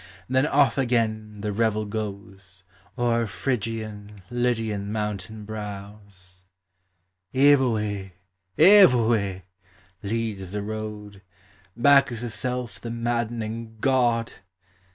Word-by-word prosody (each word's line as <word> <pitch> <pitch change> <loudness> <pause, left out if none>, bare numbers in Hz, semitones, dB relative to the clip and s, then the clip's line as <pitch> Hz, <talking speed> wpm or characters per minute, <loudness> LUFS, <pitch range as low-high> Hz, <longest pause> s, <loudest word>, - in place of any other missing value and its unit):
Then 130 +3 +2
off 140 -2 +3
again 110 -4 -1
the 105 -1 -2
revel 110 0 0
goes 100 -3 -7 0.3
O'er 115 -1 +1
Phrygian, 105 -3 -4
Lydian 115 -4 -1
mountain 105 0 -4
brows 100 -3 -9 0.9
j 140 +2 +6
Evoe! 105 -7 0 0.5
Evoe! 120 - +5 0.6
leads 105 -3 -3
the 105 -1 -3
road, 105 -2 -6 0.6
Bacchus's 120 -3 +3
self 125 -6 -3
the 115 - -6
maddening 115 -1 -3
god! 120 -3 +2
110 Hz, 90 wpm, -25 LUFS, 105-120 Hz, 0.9 s, j